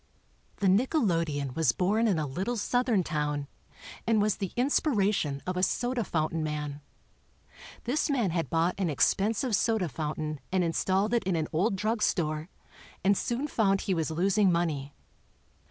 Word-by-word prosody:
The 200 Hz, -, -2 dB
nickelodeon 170 Hz, -, +1 dB
was 160 Hz, -8 st, +3 dB
born 210 Hz, +5 st, +1 dB
in 195 Hz, -6 st, +2 dB
a 155 Hz, -, -1 dB
little 190 Hz, -, -3 dB
Southern 240 Hz, -2 st, +1 dB
town 150 Hz, -2 st, -2 dB, 0.6 s
and 225 Hz, -1 st, +3 dB
was 210 Hz, 0 st, +1 dB
the 195 Hz, -3 st, -3 dB
inspiration 210 Hz, -, +1 dB
of 185 Hz, -, -2 dB
a 180 Hz, -, 0 dB
soda 245 Hz, +5 st, 0 dB
fountain 160 Hz, -2 st, -1 dB
man. 150 Hz, -1 st, -4 dB, 1.0 s
This 270 Hz, +7 st, 0 dB
man 240 Hz, -10 st, +1 dB
had 165 Hz, -1 st, -1 dB
bought 165 Hz, +2 st, +1 dB
an 185 Hz, -4 st, +1 dB
expensive 210 Hz, -, +1 dB
soda 220 Hz, -4 st, +1 dB
fountain 155 Hz, 0 st, -4 dB
and 185 Hz, -1 st, +2 dB
installed 190 Hz, +5 st, +1 dB
it 235 Hz, -3 st, +2 dB
in 185 Hz, -2 st, +1 dB
an 160 Hz, -2 st, -1 dB
old 195 Hz, +6 st, +1 dB
drug 215 Hz, +3 st, -1 dB
store, 155 Hz, -3 st, 0 dB, 0.5 s
and 200 Hz, +1 st, +4 dB
soon 245 Hz, +8 st, -2 dB
found 195 Hz, -7 st, +1 dB
he 195 Hz, -, -1 dB
was 165 Hz, -3 st, -1 dB
losing 190 Hz, +4 st, +2 dB
money. 150 Hz, -5 st, -1 dB
185 Hz, 155 wpm, -28 LUFS, 155-215 Hz, 1.0 s, and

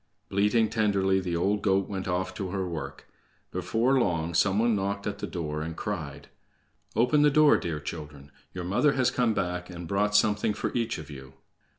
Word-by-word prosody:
Bleating 105 Hz, +3 st, +2 dB
tenderly, 100 Hz, -3 st, +1 dB
the 90 Hz, -2 st, -3 dB
old 100 Hz, +4 st, +1 dB
goat 95 Hz, -1 st, +2 dB
went 95 Hz, -2 st, -4 dB
off 95 Hz, +1 st, -1 dB
to 95 Hz, -1 st, -4 dB
her 95 Hz, 0 st, -2 dB
work. 70 Hz, -5 st, -6 dB, 0.4 s
Before 130 Hz, +4 st, +1 dB
long, 85 Hz, -6 st, 0 dB
some 95 Hz, +4 st, +3 dB
one 115 Hz, 0 st, +3 dB
knocked 100 Hz, 0 st, -2 dB
at 100 Hz, 0 st, -3 dB
the -, -, -4 dB
door, 75 Hz, -4 st, -4 dB
and 80 Hz, +1 st, -5 dB
cried: 75 Hz, -9 st, -5 dB, 0.7 s
"Open 125 Hz, +7 st, +3 dB
the 150 Hz, -, +6 dB
door, 150 Hz, +1 st, +6 dB
dear 80 Hz, -3 st, -2 dB
children! 75 Hz, -3 st, -8 dB, 0.2 s
Your 90 Hz, -, -6 dB
mother 105 Hz, +11 st, +2 dB
has 130 Hz, -2 st, +2 dB
come 120 Hz, -3 st, +1 dB
back 90 Hz, 0 st, -2 dB
and 85 Hz, -1 st, -7 dB
brought 105 Hz, +2 st, 0 dB
something 105 Hz, 0 st, +3 dB
for -, -, -3 dB
each 115 Hz, -1 st, -1 dB
of 75 Hz, -1 st, -9 dB
you." 65 Hz, -2 st, -10 dB
95 Hz, 190 wpm, -27 LUFS, 85-105 Hz, 0.7 s, the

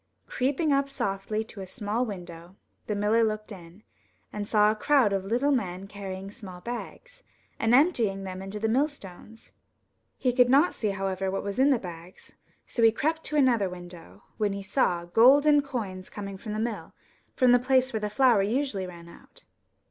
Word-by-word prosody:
Creeping 285 Hz, +4 st, 0 dB
up 275 Hz, 0 st, +1 dB
softly 215 Hz, -4 st, -2 dB
to 220 Hz, -2 st, -11 dB
a 190 Hz, -, -7 dB
small 215 Hz, +3 st, -2 dB
window, 175 Hz, -2 st, -9 dB, 0.3 s
the 210 Hz, -, -1 dB
miller 210 Hz, +3 st, +2 dB
looked 215 Hz, 0 st, -2 dB
in, 180 Hz, +1 st, -12 dB, 0.5 s
and 205 Hz, -1 st, -4 dB
saw 210 Hz, -1 st, +4 dB
a -, -, -3 dB
crowd 250 Hz, -3 st, +3 dB
of 195 Hz, -1 st, -2 dB
little 245 Hz, +8 st, +1 dB
men 190 Hz, -7 st, -2 dB
carrying 195 Hz, -1 st, -7 dB
small 185 Hz, -4 st, -10 dB
bags, -, -, -8 dB, 0.4 s
and 225 Hz, +2 st, +3 dB
emptying 235 Hz, -, +2 dB
them 185 Hz, -1 st, -6 dB
into 195 Hz, +2 st, -6 dB
the 220 Hz, -, 0 dB
millstones. 225 Hz, -, -4 dB, 0.7 s
Ke 250 Hz, -2 st, 0 dB
could 250 Hz, -1 st, +5 dB
not 285 Hz, +7 st, +4 dB
see, 215 Hz, -, -2 dB
however, 195 Hz, -1 st, -2 dB
what 195 Hz, -, -3 dB
was 200 Hz, +3 st, -4 dB
in 270 Hz, +2 st, +5 dB
the 270 Hz, -, +4 dB
bags, 175 Hz, -3 st, -11 dB, 0.3 s
so 235 Hz, -, -3 dB
he 225 Hz, -1 st, +7 dB
crept 315 Hz, +7 st, -1 dB
to 300 Hz, -, -3 dB
another 240 Hz, -9 st, +3 dB
window, 175 Hz, -, -12 dB
when 210 Hz, -2 st, 0 dB
he 200 Hz, 0 st, -6 dB
saw 180 Hz, -5 st, 0 dB
golden 285 Hz, +10 st, +5 dB
coins 210 Hz, -10 st, -6 dB
coming 200 Hz, -1 st, -7 dB
from 215 Hz, 0 st, -6 dB
the 215 Hz, -, -3 dB
mill, 225 Hz, -1 st, -4 dB, 0.4 s
from 255 Hz, -2 st, +4 dB
the 245 Hz, -, +6 dB
place 260 Hz, 0 st, +2 dB
where 220 Hz, -, -1 dB
the 210 Hz, 0 st, -3 dB
flour 240 Hz, -1 st, +4 dB
usually 215 Hz, -2 st, -1 dB
ran 170 Hz, -1 st, -11 dB
out. 170 Hz, -, -17 dB
215 Hz, 185 wpm, -27 LUFS, 195-255 Hz, 0.7 s, he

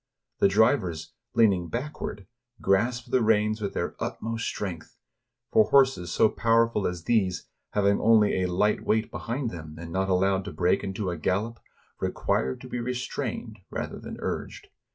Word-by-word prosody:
The -, -, +6 dB
drivers, 100 Hz, -, +2 dB, 0.2 s
leaning 95 Hz, -6 st, +4 dB
backward, 120 Hz, -6 st, -5 dB, 0.3 s
grasp 115 Hz, +6 st, +1 dB
the 130 Hz, -, +3 dB
reins 110 Hz, 0 st, +2 dB
with 100 Hz, -, -3 dB
their -, -, -2 dB
utmost 115 Hz, 0 st, -3 dB
strength; 90 Hz, -6 st, -5 dB, 0.5 s
for 110 Hz, -, +6 dB
horses 130 Hz, -, +4 dB
so -, -, +4 dB
powerful 115 Hz, -1 st, +2 dB
as 90 Hz, -2 st, -4 dB
these, 95 Hz, -4 st, +1 dB, 0.3 s
having 100 Hz, -1 st, +3 dB
only 110 Hz, -4 st, +4 dB
a 90 Hz, -, +1 dB
light 105 Hz, +4 st, +1 dB
weight 110 Hz, +1 st, +1 dB
behind 120 Hz, 0 st, -3 dB
them, 80 Hz, -2 st, -8 dB
and 85 Hz, 0 st, -8 dB
not 95 Hz, 0 st, 0 dB
allowed 95 Hz, +1 st, +2 dB
to 105 Hz, -, -6 dB
break 90 Hz, +2 st, +1 dB
into 95 Hz, -1 st, -2 dB
a 85 Hz, -, -4 dB
gallop, 105 Hz, +9 st, -1 dB, 0.4 s
require 65 Hz, +1 st, 0 dB
to -, -, -11 dB
be 125 Hz, -, -4 dB
restrained 120 Hz, -2 st, -4 dB
rather -, -, -5 dB
than -, -, -8 dB
urged. -, -, -5 dB
105 Hz, 155 wpm, -27 LUFS, 95-115 Hz, 0.5 s, The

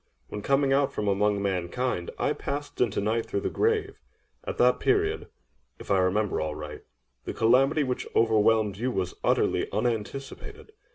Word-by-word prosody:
When, 105 Hz, -, -5 dB
coming 135 Hz, +3 st, +2 dB
out 140 Hz, 0 st, +2 dB
from 105 Hz, -, -3 dB
among 100 Hz, 0 st, +1 dB
mankind, 95 Hz, +2 st, -2 dB
I -, -, +1 dB
passed 145 Hz, +1 st, -5 dB
into 115 Hz, -4 st, +1 dB
Night 110 Hz, +3 st, 0 dB
through 100 Hz, -, -2 dB
the -, -, -2 dB
Grave—at 440 Hz, +3 st, -3 dB
that -, -, +4 dB
period, 410 Hz, +1 st, +1 dB, 0.5 s
if -, -, -7 dB
I 95 Hz, -, +4 dB
remember 95 Hz, +2 st, +1 dB
aright, 75 Hz, -1 st, -5 dB, 0.4 s
the -, -, -5 dB
calamity 135 Hz, +6 st, +3 dB
which 130 Hz, -2 st, -3 dB
overwhelmed 110 Hz, -2 st, +3 dB
you 125 Hz, +4 st, -1 dB
was 95 Hz, -7 st, -2 dB
utterly -, -, +1 dB
unanticipated. 135 Hz, -, -4 dB
115 Hz, 150 wpm, -27 LUFS, 100-140 Hz, 0.5 s, that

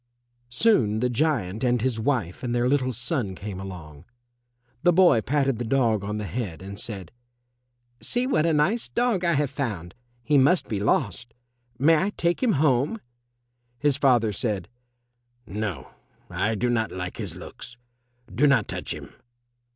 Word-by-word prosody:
Soon 120 Hz, -, +3 dB
the 125 Hz, +1 st, 0 dB
giant 120 Hz, -, 0 dB
and 125 Hz, -1 st, +2 dB
his 120 Hz, -1 st, -1 dB
wife 110 Hz, -8 st, -1 dB
and 120 Hz, -2 st, -2 dB
their 120 Hz, 0 st, +2 dB
little 130 Hz, -1 st, +1 dB
son 120 Hz, -, -2 dB
came 95 Hz, 0 st, -6 dB
along. 85 Hz, -6 st, -9 dB, 0.8 s
The 175 Hz, -, +5 dB
boy 175 Hz, -10 st, +5 dB
patted 135 Hz, -1 st, 0 dB
the -, -, -1 dB
dog 115 Hz, -4 st, +1 dB
on 105 Hz, +1 st, -3 dB
the 105 Hz, -, -4 dB
head, 100 Hz, -3 st, -4 dB
and 100 Hz, +1 st, -7 dB
said, 100 Hz, -6 st, -4 dB, 0.9 s
"See 245 Hz, +1 st, +2 dB
what 170 Hz, -, +2 dB
a -, -, +3 dB
nice 175 Hz, +11 st, +1 dB
dog 235 Hz, -6 st, 0 dB
I 170 Hz, -1 st, +3 dB
have 145 Hz, -2 st, 0 dB
found. 105 Hz, -, -4 dB, 0.3 s
He 145 Hz, +2 st, +4 dB
must 160 Hz, +7 st, +3 dB
be 105 Hz, -, -2 dB
lost. 115 Hz, +2 st, -1 dB, 0.4 s
May 155 Hz, +5 st, +5 dB
I 190 Hz, +6 st, +1 dB
take 170 Hz, +1 st, 0 dB
him 245 Hz, -4 st, +3 dB
home?" 145 Hz, -, +2 dB, 0.8 s
His 145 Hz, +1 st, +2 dB
father 125 Hz, -6 st, +3 dB
said, 100 Hz, -5 st, -2 dB, 0.8 s
"No, 105 Hz, -, -5 dB, 0.4 s
I 110 Hz, +1 st, 0 dB
do 120 Hz, +3 st, 0 dB
not 110 Hz, -2 st, 0 dB
like 90 Hz, -1 st, -5 dB
his -, -, -5 dB
looks. 125 Hz, -, -10 dB, 0.6 s
Do 150 Hz, -, +3 dB
not 140 Hz, -, +3 dB
touch -, -, -4 dB
him." -, -, -11 dB
120 Hz, 160 wpm, -25 LUFS, 105-145 Hz, 0.9 s, The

